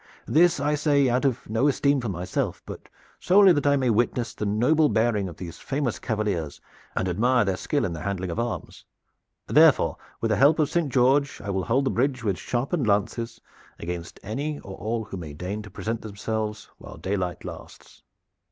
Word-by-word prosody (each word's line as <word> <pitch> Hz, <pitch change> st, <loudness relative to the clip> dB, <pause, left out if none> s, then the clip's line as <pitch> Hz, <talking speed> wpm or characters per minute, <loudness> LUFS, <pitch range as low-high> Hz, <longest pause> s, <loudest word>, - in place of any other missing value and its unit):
This 175 Hz, 0 st, +4 dB
I 145 Hz, +2 st, +1 dB
say 145 Hz, -2 st, +3 dB
out 125 Hz, +3 st, +1 dB
of 130 Hz, -4 st, -1 dB
no 115 Hz, +6 st, +1 dB
esteem 140 Hz, -1 st, +2 dB
for 120 Hz, -, -3 dB
myself, 90 Hz, -1 st, -3 dB
but -, -, -9 dB, 0.3 s
solely 190 Hz, 0 st, +6 dB
that 145 Hz, -2 st, 0 dB
I 140 Hz, -, +5 dB
may 130 Hz, -3 st, +2 dB
witness 120 Hz, +2 st, 0 dB
the 105 Hz, -, -3 dB
noble 145 Hz, +9 st, +3 dB
bearing 110 Hz, -4 st, +1 dB
of 85 Hz, -, -11 dB
these 85 Hz, -2 st, -8 dB
famous 135 Hz, -4 st, -2 dB
cavaliers 100 Hz, -9 st, -2 dB, 0.4 s
and 95 Hz, -, 0 dB
admire 120 Hz, +6 st, +2 dB
their 95 Hz, -1 st, 0 dB
skill 145 Hz, +9 st, -1 dB
in 85 Hz, -, -3 dB
the 80 Hz, -, -6 dB
handling 95 Hz, -1 st, -3 dB
of 95 Hz, -, -3 dB
arms. 120 Hz, 0 st, -4 dB, 0.6 s
Therefore, -, -, +4 dB, 0.2 s
with 115 Hz, -, -1 dB
the 105 Hz, -, +2 dB
help 145 Hz, +4 st, +5 dB
of 155 Hz, -2 st, +2 dB
Saint 170 Hz, -5 st, 0 dB
George, 135 Hz, +3 st, +3 dB
I 100 Hz, -, -4 dB
will 95 Hz, -1 st, -1 dB
hold 135 Hz, +4 st, +1 dB
the -, -, +1 dB
bridge 130 Hz, 0 st, 0 dB
with 100 Hz, -5 st, -1 dB
sharpened 130 Hz, +2 st, -1 dB
lances 105 Hz, +3 st, 0 dB, 0.4 s
against 85 Hz, 0 st, -6 dB
any 145 Hz, +9 st, -3 dB
or 95 Hz, -, -9 dB
all 110 Hz, +2 st, -3 dB
who 100 Hz, -2 st, -7 dB
may 80 Hz, -4 st, -7 dB
deign 90 Hz, +7 st, -4 dB
to 105 Hz, -, -11 dB
present 115 Hz, +4 st, -4 dB
themselves 110 Hz, 0 st, -4 dB
while -, -, -11 dB
daylight 95 Hz, -2 st, -3 dB
lasts." -, -, -11 dB
115 Hz, 190 wpm, -25 LUFS, 100-140 Hz, 0.6 s, solely